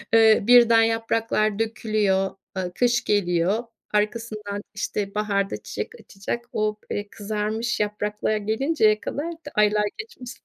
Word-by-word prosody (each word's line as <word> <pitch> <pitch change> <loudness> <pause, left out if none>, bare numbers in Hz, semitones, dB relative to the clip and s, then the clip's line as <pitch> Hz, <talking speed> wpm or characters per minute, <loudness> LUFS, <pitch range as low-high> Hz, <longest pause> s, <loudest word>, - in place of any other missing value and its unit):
ııı, 220 -2 +5
birden 235 -2 +7
yapraklar 225 -2 0
dökülüyor, 215 -4 0 0.2
ııı, 180 -1 -2
kış 245 0 +2
geliyor. 190 +2 +1 0.3
Arkasından 210 -1 -2
işte 205 0 -3
baharda 200 -2 0
çiçek - - -4
açacak. 230 +4 -5
O, 215 0 0
eee, 205 0 -3
kızarmış 215 +2 -2
yapraklar 210 +1 -1
gelinceye 220 +1 +2
kadar 320 +4 -4
da 320 -3 -10
aylar 210 0 +3
geçmesi 435 - -9
215 Hz, 120 wpm, -24 LUFS, 205-230 Hz, 0.3 s, birden